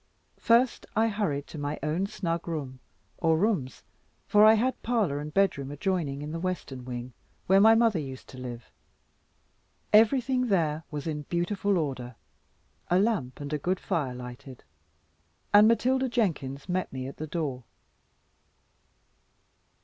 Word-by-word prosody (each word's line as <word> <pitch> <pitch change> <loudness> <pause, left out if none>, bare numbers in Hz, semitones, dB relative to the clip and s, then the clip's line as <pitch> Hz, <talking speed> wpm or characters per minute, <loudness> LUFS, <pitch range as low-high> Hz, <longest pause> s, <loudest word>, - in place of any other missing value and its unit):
First 235 +2 +2
I 225 +1 +3
hurried 170 -10 -1
to 155 - -8
my 145 +1 -3
own 160 +6 0
snug 170 -4 -3
room, 140 -6 -4 0.4
or 160 -2 +3
rooms 175 - -1 0.4
for 210 0 +5
I 220 +1 +8
had 250 +3 0
parlour 215 -12 0
and 150 +1 -6
bedroom 155 -7 +1
adjoining 145 -2 -2
in 150 - -5
the 165 - -4
western 165 -8 -4
wing, 125 0 -6 0.3
where 195 +1 +5
mother 225 -3 +5
used 135 -3 -7
to 130 - -10
live. 120 -6 -8 1.2
Everything 250 +3 +4
there 160 -6 +1
was 145 -2 -5
in 150 -2 -3
beautiful 190 +3 0
order, 130 -6 -3 0.7
a 180 - +4
lamp 190 - 0
and 145 +1 -5
a 150 - 0
good 180 +5 -1
fire 135 -6 -2
lighted; 125 +1 -10 0.9
and 205 +1 +8
Matilda 255 +3 +2
Jenkins 150 - -1
met 185 0 -2
me 130 -1 -5
at 135 - -8
the 155 - -5
door. 145 -6 -3
165 Hz, 140 wpm, -28 LUFS, 140-205 Hz, 1.2 s, I